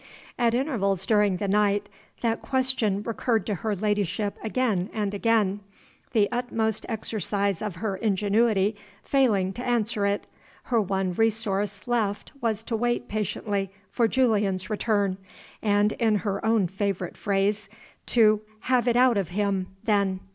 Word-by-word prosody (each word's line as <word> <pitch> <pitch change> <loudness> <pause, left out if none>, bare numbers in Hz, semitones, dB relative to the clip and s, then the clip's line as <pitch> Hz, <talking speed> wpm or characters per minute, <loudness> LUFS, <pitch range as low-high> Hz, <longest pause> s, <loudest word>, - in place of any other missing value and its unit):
At 235 -1 +2
intervals 200 - 0
during 210 -4 +3
the 200 - -2
night 205 0 +2 0.3
that 230 -1 0
question 255 -7 0
recurred 230 0 0
to 210 - -1
her 210 +3 -2
ladyship 205 0 -1
again 220 -5 0
and 205 -2 -1
again. 205 -2 +2 0.5
The 210 -4 +4
utmost 225 -3 -1
exercise 205 -3 -1
of 210 -4 -3
her 200 +1 -3
ingenuity 210 0 +2 0.3
failing 210 -9 +2
to 245 - -5
answer 225 -4 0
it, 200 0 -1 0.4
her 235 -3 +1
one 190 -2 -1
resource 205 -2 0
left 220 -4 -1
was 225 -2 0
to 230 - -2
wait 240 +2 -1
patiently 205 -1 -2 0.2
for 235 - +2
Julian's 210 -6 +1
return, 205 -3 +1 0.4
and, 205 0 +3
in 220 -1 +1
her 200 -1 -1
own 220 -3 +3
favorite 190 -1 -3
phrase, 200 +1 0 0.4
to 215 -3 +4 0.2
"have 250 -1 +1
it 240 - +3
out 250 -2 +5
of 195 -4 -1
him" 195 -1 -1 0.2
then. 200 -3 +1
210 Hz, 140 wpm, -26 LUFS, 200-230 Hz, 0.5 s, out